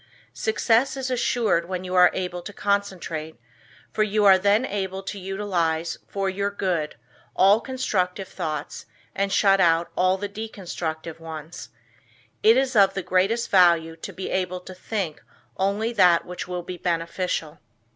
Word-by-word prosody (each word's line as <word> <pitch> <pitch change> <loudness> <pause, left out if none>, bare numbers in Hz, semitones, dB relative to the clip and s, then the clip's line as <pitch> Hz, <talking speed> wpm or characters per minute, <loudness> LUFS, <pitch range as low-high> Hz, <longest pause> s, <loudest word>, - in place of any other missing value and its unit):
Success 225 - +1
is 260 -1 -3
assured 230 -8 +1
when 185 -1 -3
you 185 0 -5
are 180 -1 +7
able 180 -1 -3
to 190 - -8
concentrate 185 -8 -2 0.5
for 215 - -1
you 215 0 +2
are 190 -1 +7
then 205 +5 +3
able 195 -2 -3
to 200 +1 -6
utilize 180 -4 -2
for 195 -1 -2
your 200 +1 -1
good 180 -6 -2 0.4
all 200 +4 +5
constructive 195 -8 -2
thoughts 155 -5 -5 0.3
and 195 0 -1
shut 195 0 +4
out 165 0 +3
all 185 +1 +2
the 205 +1 -4
destructive 175 -7 -6
ones. 160 0 -8 0.7
It 225 +3 +6
is 265 -1 +1
of 195 -2 +5
the 195 - -2
greatest 195 +7 +1
value 170 -3 +4
to - - -7
be 190 - -6
able 180 -1 -2
to 185 - -10
think 185 -4 -4 0.3
only 205 +4 0
that 180 -5 +4
which 180 0 -6
will 180 -1 -4
be 180 +1 -7
beneficial. 170 -2 -2
190 Hz, 155 wpm, -24 LUFS, 175-205 Hz, 0.7 s, are